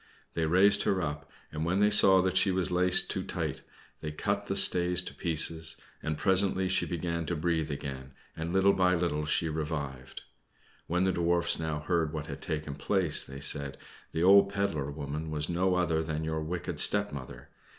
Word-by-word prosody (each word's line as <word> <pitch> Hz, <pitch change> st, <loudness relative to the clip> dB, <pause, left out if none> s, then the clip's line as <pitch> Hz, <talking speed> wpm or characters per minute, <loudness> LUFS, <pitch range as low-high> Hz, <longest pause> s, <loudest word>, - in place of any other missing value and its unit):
They 80 Hz, -1 st, -1 dB
raised 100 Hz, +5 st, +5 dB
her 95 Hz, -, +1 dB
up, 75 Hz, -3 st, -5 dB, 0.2 s
and 75 Hz, +1 st, -4 dB
when 90 Hz, +4 st, 0 dB
they 105 Hz, +1 st, +4 dB
saw 95 Hz, -2 st, +6 dB
that 95 Hz, 0 st, -1 dB
she 95 Hz, -, +4 dB
was 95 Hz, -1 st, -1 dB
laced 90 Hz, +1 st, +4 dB
too -, -, -2 dB
tight -, -, -4 dB, 0.4 s
they 75 Hz, -, -5 dB
cut 100 Hz, +6 st, -2 dB
the 95 Hz, -, -2 dB
stays 90 Hz, -2 st, +3 dB
to -, -, -8 dB
pieces, 80 Hz, -1 st, 0 dB, 0.2 s
and 75 Hz, -1 st, -3 dB
presently 95 Hz, 0 st, +2 dB
she 95 Hz, -, +1 dB
began 85 Hz, -1 st, -3 dB
to 85 Hz, -, -1 dB
breathe 80 Hz, -1 st, -1 dB
again, 70 Hz, -2 st, -6 dB, 0.2 s
and 80 Hz, +1 st, -4 dB
little 95 Hz, +2 st, +4 dB
by 90 Hz, -1 st, +2 dB
little 85 Hz, -4 st, -1 dB
she 80 Hz, +2 st, 0 dB
revived. 75 Hz, -4 st, -5 dB, 0.6 s
When 90 Hz, +2 st, 0 dB
the 95 Hz, -, +2 dB
Dwarfs 85 Hz, 0 st, +1 dB
now 80 Hz, -2 st, -3 dB
heard 80 Hz, -1 st, -1 dB
what 75 Hz, -1 st, -4 dB
had -, -, -8 dB
taken 75 Hz, -2 st, -4 dB
place, 90 Hz, +2 st, +1 dB
they 70 Hz, +1 st, -9 dB
said, 70 Hz, -1 st, -1 dB, 0.3 s
"The 80 Hz, -, -1 dB
old 100 Hz, +1 st, +6 dB
pedler 100 Hz, -8 st, -2 dB
woman 75 Hz, +2 st, -5 dB
was 75 Hz, 0 st, -2 dB
no 90 Hz, +2 st, +1 dB
other 85 Hz, -3 st, +1 dB
than 80 Hz, -1 st, -3 dB
your 80 Hz, 0 st, -2 dB
wicked 85 Hz, +3 st, -4 dB
stepmother. 100 Hz, -11 st, -1 dB
85 Hz, 185 wpm, -29 LUFS, 75-95 Hz, 0.6 s, saw